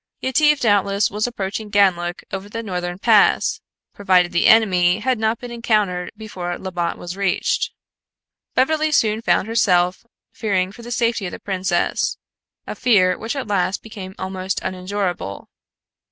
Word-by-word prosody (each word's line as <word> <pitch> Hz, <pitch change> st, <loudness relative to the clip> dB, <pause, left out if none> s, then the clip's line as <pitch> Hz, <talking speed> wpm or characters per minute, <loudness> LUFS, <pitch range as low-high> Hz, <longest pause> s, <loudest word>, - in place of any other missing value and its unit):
Yetive 295 Hz, +3 st, +3 dB
doubtless 200 Hz, -3 st, +2 dB
was 210 Hz, +3 st, -1 dB
approaching 210 Hz, -2 st, -4 dB
Ganlook 180 Hz, -3 st, +1 dB
over 195 Hz, +1 st, -5 dB
the 230 Hz, +2 st, -5 dB
northern 180 Hz, -3 st, -4 dB
pass, 215 Hz, +1 st, +3 dB, 0.3 s
provided 185 Hz, -3 st, +2 dB
the 170 Hz, -, +2 dB
enemy 185 Hz, -5 st, +5 dB
had 250 Hz, +1 st, 0 dB
not 220 Hz, +1 st, +1 dB
been 245 Hz, +1 st, -9 dB
encountered 210 Hz, -6 st, 0 dB
before 180 Hz, -5 st, -5 dB
Labbot 175 Hz, -3 st, -3 dB
was 175 Hz, +1 st, -7 dB
reached. 195 Hz, -2 st, 0 dB, 0.8 s
Beverly 310 Hz, +4 st, +2 dB
soon 220 Hz, -6 st, +2 dB
found 220 Hz, -, +1 dB
herself 185 Hz, -5 st, +2 dB, 0.3 s
fearing 190 Hz, -4 st, -1 dB
for 235 Hz, -, -13 dB
the 235 Hz, -, -9 dB
safety 230 Hz, -4 st, 0 dB
of -, -, -6 dB
the -, -, -8 dB
princess, 190 Hz, -1 st, -1 dB, 0.5 s
a -, -, -5 dB
fear 185 Hz, -7 st, +3 dB
which 225 Hz, +8 st, -5 dB
at 270 Hz, -2 st, -3 dB
last 195 Hz, -2 st, -1 dB
became 195 Hz, -4 st, -9 dB
almost 190 Hz, 0 st, -3 dB
unendurable. 185 Hz, -, -4 dB
200 Hz, 145 wpm, -20 LUFS, 185-225 Hz, 0.8 s, enemy